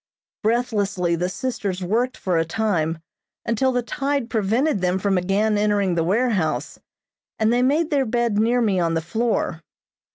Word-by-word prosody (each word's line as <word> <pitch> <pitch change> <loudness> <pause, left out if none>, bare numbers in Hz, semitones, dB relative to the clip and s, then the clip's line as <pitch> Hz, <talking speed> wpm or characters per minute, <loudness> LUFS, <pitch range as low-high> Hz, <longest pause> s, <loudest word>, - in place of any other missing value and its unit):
Breathlessly 205 -6 0
the 175 +2 -1
sisters 200 -4 -3
worked 235 +7 0
for 180 -3 0
a - - +2
time, 165 -3 -1 0.5
until 240 +3 +1
the 245 -1 0
tide 275 0 -2
prevented 225 +3 +1
them 180 0 +1
from 195 0 0
again 200 +4 +1
entering 205 -3 +1
the 165 -1 +1
warehouse, 200 -2 0 0.6
and 220 +1 +2
they 245 - +2
made 300 +5 +2
their 275 -3 +2
bed 235 -2 0
near 240 +3 +2
me 200 -5 +2
on 165 -1 +1
the 165 - 0
floor. 200 -2 -1
210 Hz, 160 wpm, -22 LUFS, 180-240 Hz, 0.6 s, a